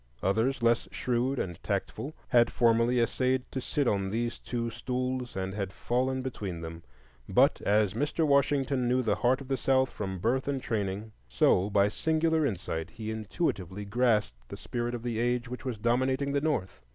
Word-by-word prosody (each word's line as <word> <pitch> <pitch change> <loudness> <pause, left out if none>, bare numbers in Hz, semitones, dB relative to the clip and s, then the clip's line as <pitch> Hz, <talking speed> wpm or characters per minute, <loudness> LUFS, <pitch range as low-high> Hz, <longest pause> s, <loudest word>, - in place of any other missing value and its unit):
Others 115 +7 +1
less 115 0 +3
shrewd 125 +2 0
and 85 -7 -4
tactful 150 +4 -3
had 120 -2 +4
formerly 120 +1 +3
essayed 130 +2 +1
to 130 - -3
sit 140 +1 0
on 100 -3 +1
these 115 +3 -2
two 115 -1 -3
stools 125 +1 -3
and 95 0 -3
had 100 -2 -3
fallen 130 +5 -1
between 100 -10 -5
them; 80 0 -7 0.5
but - - +4
as 105 -1 +2
Mr. 150 +6 0
Washington 140 -2 +2
knew 125 +1 +2
the 110 -3 +2
heart 130 +3 +2
of 135 - -9
the 135 0 0
South 130 +1 +2
from 95 -2 -4
birth 120 +9 0
and 140 -1 0
training, 105 -3 -3 0.2
so 90 +10 +3
by 100 0 +4
singular 160 +6 +1
insight 85 - -3
he 110 -1 -6
intuitively 105 - -3
grasped 105 - 0
the - - -7
spirit 120 0 -3
of 120 - -6
the 120 -2 -2
age 120 0 0
which 125 +3 -7
was 125 -4 -2
dominating 130 +5 +1
the 140 0 +1
North. 130 - -1
120 Hz, 175 wpm, -29 LUFS, 105-130 Hz, 0.5 s, had